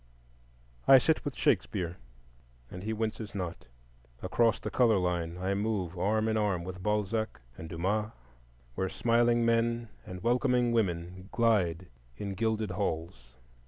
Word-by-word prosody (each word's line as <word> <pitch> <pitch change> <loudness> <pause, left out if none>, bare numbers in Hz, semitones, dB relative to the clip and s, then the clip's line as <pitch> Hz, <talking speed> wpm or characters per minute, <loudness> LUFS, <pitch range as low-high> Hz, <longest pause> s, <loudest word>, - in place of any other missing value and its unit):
I 135 - +10
sit 155 +5 +2
with 145 - -4
Shakespeare 90 -5 0 0.7
and 90 - -7
he 110 +3 -3
winces 110 -1 -3
not. 90 -7 -5 0.6
Across 115 +5 +2
the - - -4
color 115 -4 +4
line 90 -2 -1
I 95 +2 -1
move 100 -4 -1
arm 110 +5 +1
in 110 0 +1
arm 100 -5 0
with 90 +1 -7
Balzac 105 +2 -1 0.2
and 80 +4 -8
Dumas, 100 +6 -1 0.6
where 95 +8 -1
smiling 120 +1 +2
men 115 0 +1
and 90 +1 -8
welcoming 125 0 +2
women 90 -3 -1
glide 95 -7 +2 0.3
in 100 -1 -4
gilded 110 0 -1
halls. 80 -9 -4
105 Hz, 135 wpm, -30 LUFS, 90-115 Hz, 0.7 s, I